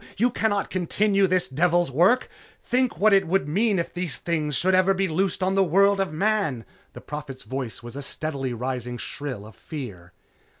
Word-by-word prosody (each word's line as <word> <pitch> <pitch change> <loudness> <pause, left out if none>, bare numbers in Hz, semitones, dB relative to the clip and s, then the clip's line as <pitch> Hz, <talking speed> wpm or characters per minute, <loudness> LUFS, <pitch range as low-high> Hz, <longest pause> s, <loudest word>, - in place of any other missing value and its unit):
You 245 +5 +3
cannot 210 -3 0
continue 195 +2 +2
this 185 -5 +2
devil's 170 +4 +1
work! 185 - +3 0.4
Think 255 0 0
what 215 0 +4
it 195 -3 +4
would 185 -4 +1
mean 205 +6 +2
if 170 - -2
these 175 -8 -3
things 150 0 -2
should 185 +8 +2
ever 185 +1 +4
be 195 0 +1
loosed 185 +3 -1
on 190 +1 +1
the 195 0 +4
world 195 +3 +3
of 195 -4 0
Man!" 160 - 0 0.3
the - - -10
Prophet's 145 -3 -7
voice 130 -4 -5
was 120 +1 -9
a 140 - -5
steadily 140 -2 -3
rising 125 0 -4
shrill 130 -6 -6
of 110 - -13
fear. 105 - -8
170 Hz, 185 wpm, -25 LUFS, 135-195 Hz, 0.4 s, what